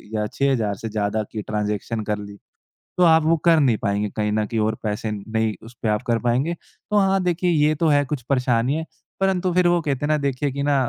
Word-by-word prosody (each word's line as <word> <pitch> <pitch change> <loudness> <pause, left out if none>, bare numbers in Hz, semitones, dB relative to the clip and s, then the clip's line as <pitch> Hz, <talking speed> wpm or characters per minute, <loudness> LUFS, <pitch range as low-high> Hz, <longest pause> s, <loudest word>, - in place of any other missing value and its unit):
या 105 0 0
6000 115 -4 0
से 115 +3 -6
ज़्यादा 105 0 -1
की 110 - -4
ट्रांजेक्शन 105 +1 -3
कर 105 0 -2
ली। 100 0 -9 0.6
तो 180 - +4
आप 160 0 +5
वो 165 +1 +4
कर 165 -2 +6
नहीं 125 -7 +3
पाएँगे 100 0 0
कहीं 105 -1 0
न 105 0 +1
कहीं 115 +1 -2
और 110 +1 0
पैसे 105 0 -2
नहीं 110 +1 -2
उस 120 +2 -13
पे 110 - +1
आप 105 0 +1
कर 115 -1 +2
पाएँगे। 130 +8 +1
तो 210 +4 -5
हाँ 195 -1 +2
देखिए 180 0 +1
ये 155 -1 +3
तो - - +4
है 145 -2 +4
कुछ 140 -1 -3
परेशानी 125 -1 +1
है। 160 0 -3 0.3
परंतु 190 -2 +1
फिर 180 0 +3
वो 175 0 +3
कहते 145 -2 -2
हैं - - -1
ना 155 - +3
देखिए 140 0 -1
कि 140 +1 -3
ना - - +3
125 Hz, 235 wpm, -22 LUFS, 105-155 Hz, 0.6 s, कर